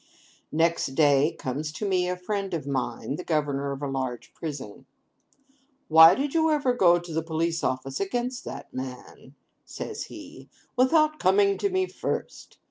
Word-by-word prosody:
Next 165 -4 +1
day 145 +1 +4
comes 145 +4 -4
to 205 +6 -3
me 180 -2 +1
a 180 - -2
friend 195 0 -3
of 150 -4 -5
mine, 140 +1 -3
the 180 - -6
governor 145 -4 -1
of 140 +1 -6
a - - -1
large 130 -3 -4
prison. 140 -10 -7 1.0
'Why 160 +1 +9
did 275 +1 -2
you 320 -1 +3
ever 290 -5 +2
go 175 -8 +5
to 175 -1 -7
the 160 - 0
Police 165 +1 -2
Office 130 +1 -2
against 245 +5 -2
that 140 +1 -8
man,' 130 +1 -8 0.3
says - - -6
he, - - -12 0.3
'without 305 +4 +3
coming 200 +1 +4
to 400 - +1
me 375 0 +1
first? - - -5
165 Hz, 160 wpm, -26 LUFS, 140-205 Hz, 1.0 s, Why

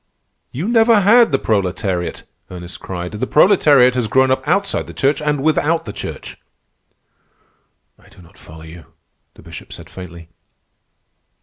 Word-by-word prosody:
"You 155 +10 -4
never 225 -2 +4
had 230 +3 +5
the 135 - +2
proletariat," 95 -5 -2 0.3
Ernest 90 -1 -9
cried. 90 -1 -6
"The 110 +4 -4
proletariat 145 -8 +4
has 125 -3 -1
grown 130 +4 +2
up 130 +2 -1
outside 200 +5 -1
the - - -11
Church 140 +3 0
and 150 -2 -1
without 160 +1 0
the 105 - -7
Church." - - -8 1.6
"I - - -22
do - - -20
not 90 +2 -19
follow 80 -2 -14
you," 80 0 -13 0.5
the - - -17
Bishop - - -12
said - - -12
faintly. 85 -3 -11
130 Hz, 145 wpm, -17 LUFS, -, 1.6 s, had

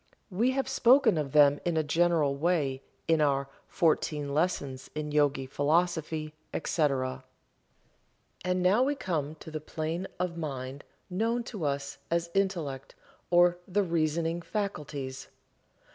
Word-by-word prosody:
We 220 +7 +2
have 270 0 -1
spoken 260 -3 +5
of 140 -3 -3
them 145 -1 +6
in 170 -2 0
a 155 - +3
general 160 -2 +2
way 145 -4 0 0.3
in 160 -1 +3
our 140 -2 +2 0.2
"Fourteen 150 -4 +1
Lessons 140 -5 -1
in 150 -1 -3
Yogi 145 -2 +2
Philosophy, 155 +2 0 0.2
etc." 135 -6 0 1.2
And 180 0 0
now 195 +6 +4
we 280 +3 +2
come 155 - -2
to 160 - -11
the 155 -1 -4
plane 160 +4 -3
of 180 -2 -2
mind 135 -3 -5 0.3
known 230 +6 0
to 210 -9 -5
us 140 0 -2
as 170 0 0
Intellect 165 -9 -1 0.3
or 175 0 +5
the 205 +2 +1
Reasoning 165 0 0
Faculties. 150 -10 -4
160 Hz, 130 wpm, -29 LUFS, 145-180 Hz, 1.2 s, them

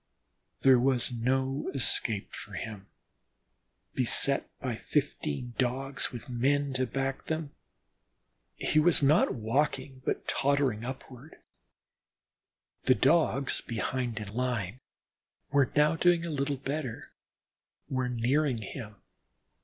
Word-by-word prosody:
There 130 -2 +6
was 130 -1 +1
no 130 +3 -1
escape 110 -5 +1
for - - -8
him, 105 -3 -6 1.1
beset - - +4
by - - -3
fifteen 120 - -2
Dogs 130 +1 0
with 120 - -8
men 135 +3 0
to 130 0 0
back 135 +2 -3
them. 160 -2 -3 1.0
He 155 - +1
was 160 -1 +5
not 145 0 +4
walking, 130 +3 -1
but - - -2
tottering 135 -5 +1
upward; 130 +3 -9 1.5
the 130 - +5
Dogs 140 -1 +2
behind 120 0 -3
in 105 -2 -5
line, 120 -3 -2 0.7
were 140 -3 +3
now 150 +2 +4
doing 175 0 +3
a 170 - -4
little 140 -1 -1
better, 135 -3 -5 0.8
were 130 -1 -1
nearing 125 +3 +1
him. 110 0 -8
130 Hz, 110 wpm, -29 LUFS, 120-140 Hz, 1.5 s, There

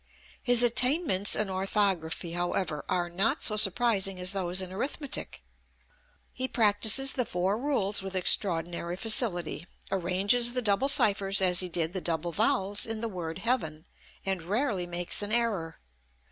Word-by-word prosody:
His 245 -1 +3
attainments 245 - +2
in 215 - -1
orthography, 190 -3 -1
however, 175 -2 -3
are 175 -1 -1
not 190 +6 -1
so 215 - +4
surprising 200 -2 +1
as 180 +1 0
those 185 -2 0
in 185 -1 -3
arithmetic. 275 +6 -5 0.9
He 260 +1 -2
practises 225 +4 +3
the 250 - -1
four 185 -1 -2
rules 220 -6 0
with 190 0 -7
extraordinary 175 -2 0
facility, 185 -6 0 0.2
arranges 195 +7 +1
the 250 - 0
double 220 +6 +1
ciphers 195 -6 +3
as 180 -2 +3
he 185 - 0
did 165 0 -2
the 185 - -4
double 170 0 -3
vowels 195 +6 +1
in 225 -1 -4
the 230 - -3
word 170 -4 -6
Heaven, 185 -8 -3 0.4
and 190 -2 -2
rarely 200 - -2
makes 175 +2 -2
an 205 +1 -3
error. 210 -9 -1
195 Hz, 145 wpm, -27 LUFS, 175-225 Hz, 0.9 s, so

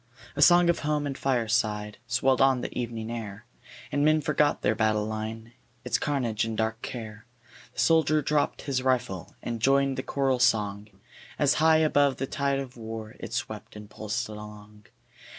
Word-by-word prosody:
A 145 - -2
song 175 +3 +7
of 170 - +2
home 150 -1 -1
and 140 -1 -3
fireside 110 -5 0
Swelled 130 +2 +2
on 135 -2 +4
the - - -6
evening 115 -2 -4
air, 110 -2 -6 0.5
And 145 - +1
men 155 +1 +4
forgot 150 -1 +1
their 105 - +3
battle 110 -1 +1
line, 110 +1 -5 0.3
Its 125 - +1
carnage 125 -7 -1
and 110 -1 -3
dark 110 0 -1
care; 110 -2 -7 0.5
The - - -9
soldier 155 -2 +3
dropp'd 150 +1 0
his 135 -3 -1
rifle 125 -9 -1
And 115 -2 -4
joined 135 +1 +3
the - - 0
choral 135 -1 0
song, 105 -4 +1 0.5
As - - +3
high 160 0 +6
above 145 -4 +3
the 135 - -2
tide 140 0 -1
of 135 -2 -6
war 110 -1 -7
It - - -7
swept - - -5
and 105 0 -11
pulsed 110 +3 -3
along. 105 0 -11
120 Hz, 170 wpm, -27 LUFS, 110-140 Hz, 0.5 s, song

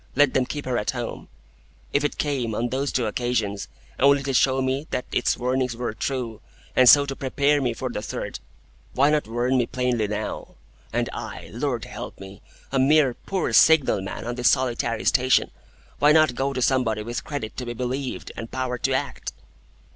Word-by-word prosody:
Let 145 0 +4
them 130 -1 +1
keep 145 -1 -5
her 125 -2 0
at 105 - -3
home'? 120 -2 -4 0.7
If 140 - +2
it 145 - -1
came, 130 -7 -1
on 120 +2 -1
those 135 +2 -1
two 125 - 0
occasions, 110 -3 -1 0.3
only 140 +1 +5
to 135 0 -2
show 130 +1 +3
me 135 +3 -1
that 125 - -2
its - - +1
warnings 125 -1 -1
were 120 -2 -3
true, 120 -3 -3 0.3
and 130 -1 +7
so 145 -1 +8
to 135 -1 -4
prepare 140 +2 +1
me 120 -3 -1
for - - -3
the - - -4
third, - - -5 0.6
why 140 +3 +4
not 150 -5 +1
warn 120 +3 +1
me 120 - +1
plainly 125 -4 0
now? 105 +1 -5 0.4
And - - 0
I, - - -7
Lord - - -2
help - - -8
me! 95 +1 -11 0.3
A 135 - +1
mere 140 -1 +4
poor 190 +9 -3
signal 160 -10 +5
man 95 - -6
on 120 - -2
this 125 0 +3
solitary 120 -3 0
station! 130 0 +3 0.5
Why 145 +1 +6
not 155 -4 +5
go 135 +3 -1
to 130 -2 -1
somebody 115 -5 +1
with 120 +2 -4
credit 135 -8 -5
to 125 - -4
be 120 - -3
believed, 130 +2 -4
and 115 0 -6
power 130 -2 -3
to - - 0
act?" - - -3
130 Hz, 190 wpm, -24 LUFS, 120-140 Hz, 0.7 s, so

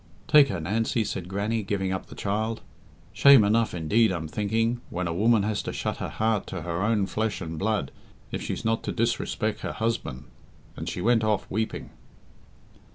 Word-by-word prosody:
"Take 150 -2 +7
her, 95 -8 -3
Nancy," 110 +7 0
said 95 -4 -4
Grannie, 105 +4 -1
giving 95 -2 -2
up 95 - -3
the - - -11
child. 110 +3 -2 0.5
"Shame 130 +3 +7
enough, 110 0 +2
indeed, 100 +7 +3
I'm 85 -3 -3
thinking, 115 +7 0
when 90 +1 -3
a 85 - -2
woman 110 +3 +3
has 105 0 -1
to - - -4
shut - - -3
her - - -4
heart 110 -2 0
to 95 -4 -5
her 85 +1 -2
own 105 -1 +2
flesh 110 +1 -2
and 80 -2 -5
blood 105 -9 0 0.4
if - - -3
she's - - -4
not 115 0 +1
to - - -1
disrespect 115 -1 -1
her - - -4
husband," 80 - -2 0.5
and - - -5
she 90 - -4
went 115 +2 +3
off, 110 -2 +1
weeping. 110 +2 -3
105 Hz, 185 wpm, -26 LUFS, 95-115 Hz, 0.5 s, Take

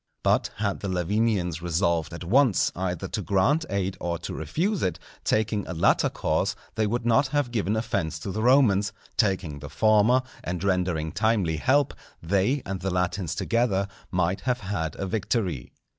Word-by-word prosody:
But - - +2
had 100 -2 -1
the 100 - -4
Lavinians 90 -1 0
resolved 85 -1 0
at 85 +1 -7
once 120 +4 +3
either 90 -2 -3
to - - -2
grant 140 +12 +2
aid 95 -1 -1
or 85 -1 -2
to 85 - -6
refuse 170 - -1
it, 90 -3 0 0.3
taking 110 -1 +1
a 90 - -5
latter 80 - +3
course - - 0 0.2
they 110 0 0
would 120 +2 -2
not 120 +4 +4
have 145 -3 0
given 110 -2 0
offence 100 -8 -1
to 100 - -4
the 110 - -3
Romans, 110 -6 +4 0.2
taking 95 -9 0
the 70 +1 -8
former, 110 - +4 0.2
and 90 +1 -3
rendering 90 -5 0
timely 100 -5 +1
help, 140 - +2 0.3
they 100 - +1
and 95 -1 -4
the 95 - -2
Latins 90 -1 -1
together 105 -5 +1 0.2
might 90 0 0
have 125 -1 -1
had 85 -6 -3
a 95 - -4
victory. 95 - -2
100 Hz, 170 wpm, -26 LUFS, 90-115 Hz, 0.3 s, not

